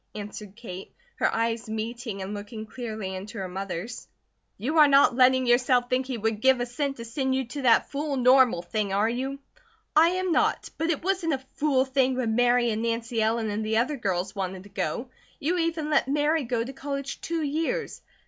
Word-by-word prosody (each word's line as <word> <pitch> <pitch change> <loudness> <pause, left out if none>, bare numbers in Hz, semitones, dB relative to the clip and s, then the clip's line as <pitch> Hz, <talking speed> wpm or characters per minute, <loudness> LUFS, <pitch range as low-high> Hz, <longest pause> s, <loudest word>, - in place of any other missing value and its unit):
answered 210 -1 -8
Kate, 195 -5 -9 0.3
her - - +2
eyes 230 0 -1
meeting 220 -2 -4
and 195 +2 -5
looking 210 +2 -7
clearly 220 -4 -5
into 200 +5 -7
her 190 -1 -3
mother's. 195 +4 -5 0.5
"You 295 +10 0
are 300 - +9
not 275 -3 +5
letting 260 0 +5
yourself 245 0 +3
think 255 +1 +1
he 255 -3 -3
would 220 0 -1
'give 265 0 +5
a 245 - 0
cent' 275 +3 -3
to 230 - -7
send 260 +3 -1
you 265 0 -1
to 285 +3 -5
that 240 -3 +4
fool 285 0 -2
normal 250 -7 +5
thing, 200 +3 -2
are 205 +2 +2
you?" 260 +4 -2 0.6
"I 320 +2 +7
am 370 0 -1
not! - - +1
But 325 +1 0
it 325 -1 -1
wasn't 365 -4 0
a 265 0 -10
'fool 280 -4 +2
thing' 265 -1 +1
when 240 -3 0
Mary 245 0 +3
and 215 +1 -2
Nancy 230 0 -1
Ellen, 220 0 +1
and 210 +1 -2
the 220 +1 0
older 260 +6 +1
girls 190 -5 -2
wanted 190 -1 -4
to 205 - -14
go. 235 +5 -3 0.3
You 350 +5 0
even 325 -2 -1
let 300 - +3
Mary 295 +1 +1
go 235 -1 0
to 260 +3 -7
college 275 0 -5
two 330 -1 -2
years." 305 +3 -2
245 Hz, 205 wpm, -26 LUFS, 220-275 Hz, 0.6 s, are